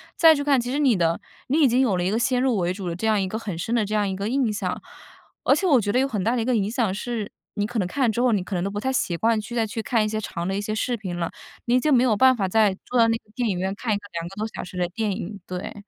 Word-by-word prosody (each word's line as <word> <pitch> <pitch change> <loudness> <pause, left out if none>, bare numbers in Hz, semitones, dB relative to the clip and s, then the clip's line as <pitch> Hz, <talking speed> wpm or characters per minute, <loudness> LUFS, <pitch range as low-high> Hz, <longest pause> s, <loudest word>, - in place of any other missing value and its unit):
再 320 -2 +7
去 285 - -2
看， 275 -4 +3
其 245 +1 -4
实 280 - -1
你 270 -7 +3
的 165 -2 +1 0.3
你 295 +5 +2
已 285 - +6
经 250 +2 +3
有 205 -8 +2
了 175 - 0
一 185 - 0
个 225 - +1
先 250 0 +1
入 255 -5 +2
为 175 -1 0
主 185 -1 -5
的 170 - -2
这 220 +5 -2
样 215 -2 +3
一 190 - 0
个 220 +4 -4
很 200 -7 -5
深 225 +7 -3
的 230 -3 +2
这 215 +1 -2
样 205 -1 +2
一 190 - -2
个 200 +3 -3
印 250 -5 +1
象。 205 - -3 0.6
而 - - +5
且 385 - -1
我 275 -9 +5
觉 205 0 -1
得 250 - +2
有 270 - +2
很 210 -8 -2
大 235 +3 +1
的 235 - 0
一 - - -2
个 255 -2 +2
影 205 -1 +1
响 225 -5 0
是， 220 0 -4 0.2
你 205 -1 0
可 225 0 -3
能 180 - 0
看 270 +8 -1
了 235 - +4
之 235 - -1
后， 250 -2 +3
你 200 -4 +1
可 195 - -7
能 175 - -1
都 200 - -1
不 205 +1 -4
太 265 +4 -1
习 175 -8 0
惯 225 +1 +2
去 240 +3 -8
再 225 -1 +2
去 220 +1 -4
看 220 -1 +1
一 - - 0
些 215 0 -2
长 170 -3 -4
的 195 - -1
一 200 - -1
些 215 +1 -3
视 240 +3 -1
频 185 -5 -5
了， 170 -1 -2 0.3
你 240 - +1
已 - - +5
经 300 +3 +1
没 250 -1 +5
有 225 -4 +3
办 260 +4 +5
法 195 -2 0
再 210 -1 +3
坐 250 - 0
到 230 - +6
那 225 0 +1
个 - - -27
电 245 -4 0
影 185 - -1
院 190 +2 -1
看 225 0 -3
一 - - +1
个 205 - -13
2 170 0 -3
个 195 - -13
多 215 +2 -2
小 - - -4
时 180 0 -9
的 175 -1 +1
电 215 +2 -2
影， 200 +2 -6
对。 185 +3 -6
215 Hz, 380 characters per minute, -24 LUFS, 195-245 Hz, 0.6 s, 再